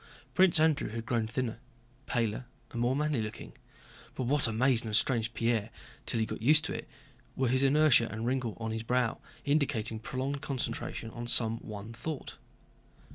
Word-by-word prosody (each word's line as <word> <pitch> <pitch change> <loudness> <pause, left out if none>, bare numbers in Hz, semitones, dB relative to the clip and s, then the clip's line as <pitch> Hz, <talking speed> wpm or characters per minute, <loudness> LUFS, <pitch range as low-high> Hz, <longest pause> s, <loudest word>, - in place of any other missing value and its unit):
Prince 185 -4 +5
Andrew 155 -6 +3
had 115 +1 -5
grown 115 -2 0
thinner, 115 0 -2 0.5
paler, 115 0 -1 0.2
and 120 - -3
more 125 +2 +2
manly 150 -4 +1
looking, 105 -1 -6 0.6
but - - -2
what 140 +1 +2
amazed 120 +2 +2
and 110 - -4
estranged 115 +1 +1
Pierre 115 -2 +1 0.4
till 115 - +1
he 110 - +2
got - - -6
used 155 +6 +5
to - - -2
it - - -6 0.5
were 130 -2 +1
his 130 +1 +2
inertia 140 -3 +5
and 110 - -5
a - - -2
wrinkle 125 -2 -1
on 110 -1 -3
his 110 0 -2
brow 125 0 +1 0.3
indicating 140 -7 +1
prolonged 135 +4 -3
concentration 120 -4 -3
on 120 +1 -6
some 115 -1 +2
one 105 +1 -8
thought. 135 +5 -5
120 Hz, 175 wpm, -31 LUFS, 115-135 Hz, 0.6 s, Prince